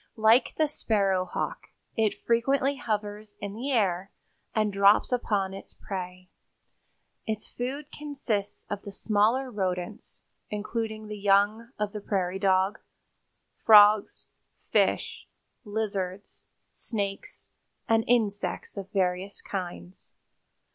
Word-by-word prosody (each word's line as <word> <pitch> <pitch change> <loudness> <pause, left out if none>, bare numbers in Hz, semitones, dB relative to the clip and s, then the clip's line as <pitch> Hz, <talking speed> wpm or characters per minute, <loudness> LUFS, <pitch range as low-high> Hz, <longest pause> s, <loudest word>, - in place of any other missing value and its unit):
Like 220 +3 +4
the 310 - +3
sparrowhawk, 195 -9 -1 0.3
it 220 -2 0
frequently 270 +4 +2
hovers 210 -4 -4
in 200 -1 -5
the 245 +6 -4
air 195 -6 +1 0.5
and 215 -2 +1
drops 200 +4 +5
upon 205 -6 0
its 195 - -9
prey. 185 -1 -6 1.0
Its 215 -1 -3
food 275 +4 -5
consists 270 -9 -3
of 205 -1 -3
the 200 - -8
smaller 220 +6 +1
rodents, 185 -1 -4 0.3
including 215 +1 -3
the 210 -1 -7
young 205 +3 +3
of 210 -1 -1
the 210 - -5
prairie 190 -2 -1
dog, 190 +1 +2 0.8
frogs, 210 -1 +6 0.5
fish, - - +1 0.4
lizards, 200 -3 -4 0.3
snakes 205 - -5 0.4
and 225 0 +3
insects 205 -6 0
of 195 -1 -6
various 185 0 -1
kinds. 175 - -7
205 Hz, 105 wpm, -28 LUFS, 195-225 Hz, 1.0 s, frogs